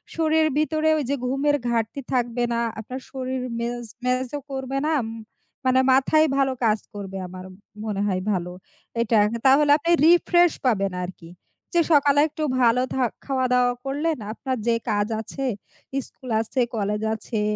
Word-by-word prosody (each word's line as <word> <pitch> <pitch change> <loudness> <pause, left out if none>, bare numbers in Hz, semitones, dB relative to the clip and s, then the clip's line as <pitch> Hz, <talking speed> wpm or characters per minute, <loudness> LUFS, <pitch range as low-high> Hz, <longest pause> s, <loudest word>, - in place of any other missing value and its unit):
শরীর 320 -1 +3
ভিতরেও 315 0 +2
ওইযে 280 0 -1
ঘুমের 275 +3 +1
ঘাটতি 230 +4 -1
থাকবে 240 -1 0
না, 235 - 0 0.2
আপনার 255 +4 -6
শরীর 260 -1 -3 0.2
ম্যাজ 240 +1 -3 0.2
ম্যাজো 255 +3 -1
করবে 265 0 -3
না - - +1
আম 225 - -5 0.6
মানে 260 0 +4
মাথায় 310 +4 +4
ভালো 270 -1 +2
কাজ 215 -1 +3
করবে 195 -1 -6
আমার, 185 +1 -9 0.4
মনে 205 -2 -2
হয় 185 -2 0
ভালো। 180 -2 -2 0.5
এটা 225 -1 +2 0.3
তাহলে 285 +2 +5
আপনি 335 +3 -1
রিফ্রেশ 345 0 +5
পাবেন 195 -5 +2
আরকি। 175 -2 -9 0.4
যে, 340 - +4
সকালে 285 -1 +5
একটু 310 0 -5 0.2
ভালো 240 +1 +4
থা 265 - +1 0.2
খাওয়া-দাওয়া 250 -2 +2
করলেন 300 +3 -1
আপনার 260 +2 -3
যে, 235 - +4 0.2
কাজ 205 0 +1
আছে, 270 +5 -5 0.6
স্কুল 255 - -13
আছে, 245 +3 -1
কলেজ 210 0 -1
আছে, 220 0 -3
255 Hz, 150 wpm, -24 LUFS, 225-285 Hz, 0.6 s, তাহলে